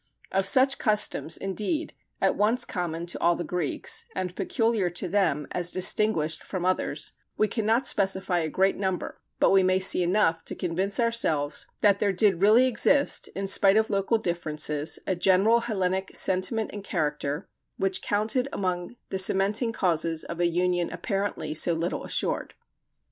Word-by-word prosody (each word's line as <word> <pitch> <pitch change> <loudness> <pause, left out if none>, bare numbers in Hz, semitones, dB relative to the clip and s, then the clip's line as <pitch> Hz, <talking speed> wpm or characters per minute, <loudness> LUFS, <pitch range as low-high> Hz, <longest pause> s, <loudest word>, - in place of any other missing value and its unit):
Of 190 0 +2
such 265 +5 +4
customs, 210 -7 +1
indeed, 210 - -3 0.3
at - - +2
once 230 +4 +1
common 170 -2 -4
to 175 - -4
all 170 0 +3
the 175 - -4
Greeks, 170 -3 -2
and 180 -1 -3
peculiar 215 -1 0
to 175 +2 -5
them 175 -7 +1
as 175 -1 -2
distinguished 180 -4 0
from 185 -2 -4
others, 185 0 -2 0.2
we 215 - +2
cannot 225 +4 0
specify 190 -4 +1
a 160 -1 -2
great 190 +4 +1
number, 190 -2 -3 0.2
but - - +4
we 195 0 +5
may 185 0 +2
see 185 -1 +4
enough 175 -2 +1
to - - -4
convince 190 +4 -1
ourselves 165 -11 0 0.2
that 200 -1 +4
there 205 -1 +1
did 190 -2 +2
really 220 +5 +6
exist, 280 +3 +3
in 195 - -3
spite 195 +1 +4
of 220 0 +1
local 200 +3 +1
differences, 155 -5 -2
a 190 - 0
general 195 +6 +3
Hellenic 190 -5 -2
sentiment 190 +4 0
and 205 -1 -7
character, 150 -3 -3 0.3
which 195 -1 0
counted 220 +6 -1
among 180 +2 -3
the 190 - -2
cementing 200 +5 +1
causes 165 -5 0
of 170 - -7
a 175 - +3
union 175 0 0
apparently 195 -7 -3
so 165 +2 +2
little 165 +2 -3
assured. - - -2
190 Hz, 160 wpm, -26 LUFS, 175-210 Hz, 0.3 s, really